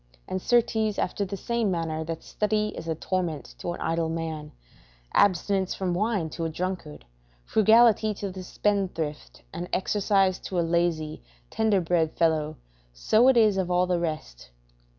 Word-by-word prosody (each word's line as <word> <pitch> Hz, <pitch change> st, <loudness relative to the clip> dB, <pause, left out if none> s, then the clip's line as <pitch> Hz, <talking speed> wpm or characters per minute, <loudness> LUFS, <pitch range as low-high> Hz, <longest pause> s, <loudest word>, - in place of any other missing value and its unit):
And, 185 Hz, -, -3 dB
certes, 220 Hz, -2 st, +2 dB
after 200 Hz, +2 st, -1 dB
the 200 Hz, +1 st, -5 dB
same 235 Hz, +1 st, -1 dB
manner 165 Hz, -3 st, -2 dB
that 165 Hz, 0 st, -5 dB
study 210 Hz, 0 st, 0 dB
is 165 Hz, -, -8 dB
a 160 Hz, -, -1 dB
torment 165 Hz, -4 st, -3 dB
to 175 Hz, -, -3 dB
an -, -, -9 dB
idle 165 Hz, 0 st, 0 dB
man, 160 Hz, -2 st, -4 dB, 0.6 s
abstinence 190 Hz, 0 st, +2 dB
from 185 Hz, -2 st, -1 dB
wine 195 Hz, -4 st, 0 dB
to 165 Hz, -, -5 dB
a 165 Hz, -, -1 dB
drunkard, 175 Hz, -, -5 dB, 0.4 s
frugality 220 Hz, 0 st, +4 dB
to 200 Hz, -1 st, -4 dB
the 185 Hz, 0 st, -7 dB
spendthrift, 180 Hz, -, -2 dB
and 175 Hz, -, -5 dB
exercise 195 Hz, -1 st, +1 dB
to 185 Hz, -, -3 dB
a 170 Hz, -, +1 dB
lazy, 165 Hz, -2 st, 0 dB, 0.3 s
tender 215 Hz, -4 st, +2 dB
bred 165 Hz, -2 st, +1 dB
fellow, 155 Hz, -2 st, +1 dB, 0.3 s
so 215 Hz, -, +3 dB
it 265 Hz, -2 st, +5 dB
is 215 Hz, -4 st, +4 dB
of 185 Hz, -2 st, -1 dB
all 180 Hz, 0 st, +3 dB
the 180 Hz, -1 st, 0 dB
rest. 155 Hz, -, -5 dB
180 Hz, 160 wpm, -26 LUFS, 165-205 Hz, 0.6 s, it